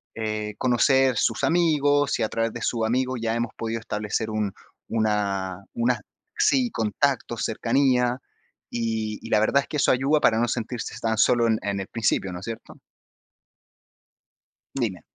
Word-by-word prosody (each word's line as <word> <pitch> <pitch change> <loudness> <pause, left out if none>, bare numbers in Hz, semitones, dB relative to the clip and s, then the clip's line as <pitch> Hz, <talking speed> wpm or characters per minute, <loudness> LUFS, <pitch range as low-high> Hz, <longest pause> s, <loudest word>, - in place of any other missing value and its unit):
eh, 110 -1 -3
conocer 130 +1 +3
sus 115 - 0
amigos, 145 -4 +2
y - - +1
a - - +1
través 115 0 -1
de 120 - -7
sus 115 -2 0
amigos 130 +1 0
ya 115 0 0
hemos 115 -1 -2
podido 115 0 -3
establecer 110 +1 -3
un 105 -2 -1 0.4
una 100 -4 -1
una 120 -1 0 0.4
sí, 255 -3 +3
contactos, 120 +2 -1
cercanía, 125 +1 +2 0.5
y 110 -2 -2
y - - -7
la 105 - +4
verdad 140 +6 +3
es - - -11
que 150 - -2
eso - - +3
ayuda 140 +4 +2
para 110 -4 +3
no 120 -1 +1
sentirse 120 0 -3
tan 110 -1 -1
solo 120 +1 +4
en 110 -1 +2
en 100 -1 -2
el 95 - -5
principio, 95 -4 0
¿no 90 - -5
es 95 - -9
cierto? 115 -1 -7 2.0
Dime. 110 -9 -2
115 Hz, 160 wpm, -25 LUFS, 110-125 Hz, 2.0 s, la